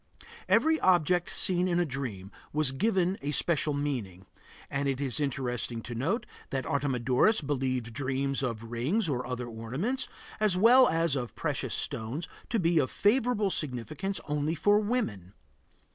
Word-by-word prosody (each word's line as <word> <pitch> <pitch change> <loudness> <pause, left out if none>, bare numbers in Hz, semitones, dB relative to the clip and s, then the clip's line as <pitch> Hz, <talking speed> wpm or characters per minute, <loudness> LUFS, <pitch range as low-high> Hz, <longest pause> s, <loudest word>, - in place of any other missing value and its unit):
Every 320 0 +4
object 175 -1 +3
seen 180 0 +3
in 175 -1 +1
a 175 - +2
dream 120 - -5 0.2
was 150 -3 +1
given 190 +3 +1
a 140 - -3
special 150 0 +2
meaning, 120 -11 -3 0.4
and 140 0 -1
it 135 -1 -1
is 140 0 -2
interesting 125 -4 -2
to 120 - -6
note 185 - -1 0.2
that 135 -2 -2
Artemidorus 135 - +2
believed 130 -5 -2
dreams 135 +1 -1
of 115 -3 -4
rings 155 - 0
or 125 -4 -2
other 125 -1 -3
ornaments, 130 - -3 0.3
as 210 -4 +2
well 245 +6 +7
as 165 -2 +1
of 125 -3 -4
precious - - -2
stones, 125 +10 -3 0.2
to 230 - +1
be 170 -2 +3
of 130 - +1
favorable 220 -2 +2
significance 150 - -3
only 150 +2 -1
for 205 +6 +4
women. 205 - -2
145 Hz, 150 wpm, -29 LUFS, 125-185 Hz, 0.4 s, well